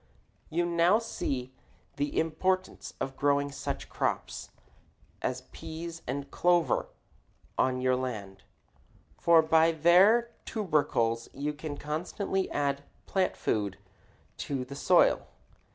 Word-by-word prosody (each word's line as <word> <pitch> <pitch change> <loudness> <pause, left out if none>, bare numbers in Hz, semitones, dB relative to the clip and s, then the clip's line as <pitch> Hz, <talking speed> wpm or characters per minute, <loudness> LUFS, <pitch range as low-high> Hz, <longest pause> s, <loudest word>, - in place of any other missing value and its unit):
You 175 +2 +1
now 170 +3 +4
see 130 - -3 0.4
the 145 +1 0
importance 185 +4 -1
of 135 0 -3
growing 140 0 +1
such - - -4
crops - - -2 0.7
as - - -2
peas 165 +1 -7
and 140 +2 -4
clover 175 -1 +2 0.7
on 130 -1 +1
your 130 0 +3
land, 105 -7 -5 0.8
for 165 -1 +6
by 160 +1 +4
their 190 +9 +5
tubercles 145 - 0
you 145 +2 -2
can 150 -1 -6
constantly 180 +6 -2
add 140 -1 -1 0.2
plant 190 -1 0
food 100 -3 -1 0.6
to 135 -3 -3
the 140 +2 -8
soil. - - +4
150 Hz, 110 wpm, -29 LUFS, 135-175 Hz, 0.8 s, for